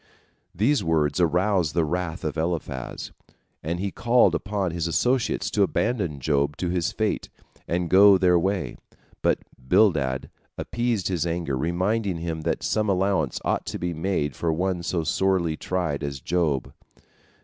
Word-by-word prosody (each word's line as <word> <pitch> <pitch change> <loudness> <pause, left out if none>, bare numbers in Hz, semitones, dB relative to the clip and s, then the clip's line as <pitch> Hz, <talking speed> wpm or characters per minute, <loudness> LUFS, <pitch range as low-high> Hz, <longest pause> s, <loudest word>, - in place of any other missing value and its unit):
These 115 +6 +2
words 75 -3 +1
aroused 90 -1 +2
the 85 -2 +3
wrath 90 +1 -3
of 75 -2 -2
Eliphaz, 80 -6 -3 0.5
and 85 +3 -3
he 100 +1 -2
called 120 +5 +3
upon 100 -3 -1
his 85 0 -2
associates 120 - 0
to 105 - +1
abandon 100 - 0
Job 70 +1 0
to 90 - -2
his 90 -2 0
fate - - -2 0.4
and 85 +1 -1
go 100 +2 +7
their 90 -2 +4
way. 95 -6 -2 0.4
But - - +2 0.3
Bildad 70 -10 +2 0.3
appeased 120 -4 -1
his 85 -3 -1
anger, 85 -5 -2
reminding 90 - 0
him 80 -1 -4
that 80 +1 -2
some 105 -1 0
allowance 95 -6 +1
ought - - -1
to - - -3
be 90 -1 -3
made 80 -3 -1
for 85 - 0
one 90 +2 -1
so 85 0 -1
sorely 90 -2 +1
tried 80 -5 -2
as 70 -1 -4
Job. 75 -4 -1
85 Hz, 150 wpm, -25 LUFS, 80-95 Hz, 0.5 s, go